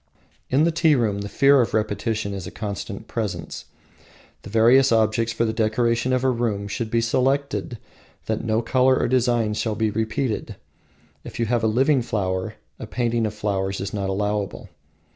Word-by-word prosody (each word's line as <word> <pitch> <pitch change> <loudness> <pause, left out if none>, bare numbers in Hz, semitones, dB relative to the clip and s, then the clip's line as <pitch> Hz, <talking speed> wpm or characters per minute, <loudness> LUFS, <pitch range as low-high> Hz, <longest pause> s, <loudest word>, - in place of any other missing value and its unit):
In 135 +4 +3
the 170 - +3
tea 160 -2 +3
room 110 -5 0
the 100 - -5
fear 140 +4 +5
of 115 - -1
repetition 110 -1 -1
is 95 -3 -6
a - - -5
constant 100 0 -6
presence. 110 -5 -4 0.8
The - - -10
various 120 +5 +5
objects 110 0 +2
for 115 +1 0
the 110 - -1
decoration 115 +2 +1
of 130 0 +1
a 130 - +3
room 110 -4 -2
should 110 +2 -4
be 115 +1 +1
so 115 +2 0
selected 135 -2 -1 0.5
that - - -2
no 110 +1 0
colour 130 +2 +3
or - - +1
design 120 -3 +1
shall 110 0 -2
be 110 0 0
repeated. 110 +2 -2 0.7
If - - -9
you 115 - +1
have 120 0 0
a - - +3
living 130 +5 +3
flower, 95 -5 -2 0.2
a - - -7
painting 120 -2 0
of 105 - -6
flowers 100 -2 -2
is 100 +1 -5
not 100 -2 -2
allowable. 105 +1 -2
115 Hz, 180 wpm, -23 LUFS, 105-125 Hz, 0.8 s, fear